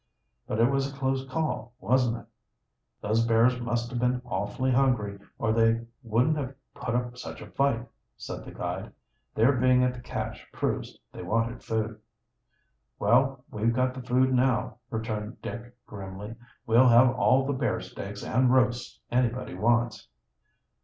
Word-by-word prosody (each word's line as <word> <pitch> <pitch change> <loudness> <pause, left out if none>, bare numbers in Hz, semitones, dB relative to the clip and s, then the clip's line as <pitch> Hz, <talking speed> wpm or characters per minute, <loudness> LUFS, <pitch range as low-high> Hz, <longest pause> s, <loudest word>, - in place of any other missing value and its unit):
"But 110 - -2
it 115 - +6
was 135 0 0
a 135 - -13
close 135 -1 -1
call, 130 -6 -2
wasn't 125 -1 +2
it?" - - -12 0.8
"Those 110 +2 +2
bears 115 +2 +3
must 120 0 -2
have 120 - -2
been 125 +1 +1
awfully 120 +3 -1
hungry, 120 -6 +2 0.2
or 110 - +1
they 115 0 +3 0.2
wouldn't 125 +6 +2
have 135 -2 -4 0.2
put 120 -1 -3
up 125 0 -1
such - - -7
a - - -11
fight," 135 -4 +1 0.3
said - - -6
the - - -10
guide. - - -5 0.4
"Their 115 +5 +5
being 130 -1 +4
at 125 0 +2
the 125 - -9
cache - - -5
proves - - -2
they - - -8
wanted 115 +2 -1
food." 110 -1 -2 1.0
"Well, 130 +4 +2
we've 115 +2 0
got 130 0 +1
the 130 - -7
food 130 +1 +2
now," 125 -1 +1
returned 110 0 -4
Dick 120 +1 -6
grimly. 100 +1 -7 0.3
"We'll 120 +3 +6
have 120 +1 +7
all 130 +1 +3
the 140 - 0
bear 130 -4 0
steaks 100 +1 -7
and 125 0 +2
roasts 125 -1 +1
anybody 125 0 0
wants." 115 - +1
120 Hz, 160 wpm, -28 LUFS, 115-130 Hz, 1.0 s, have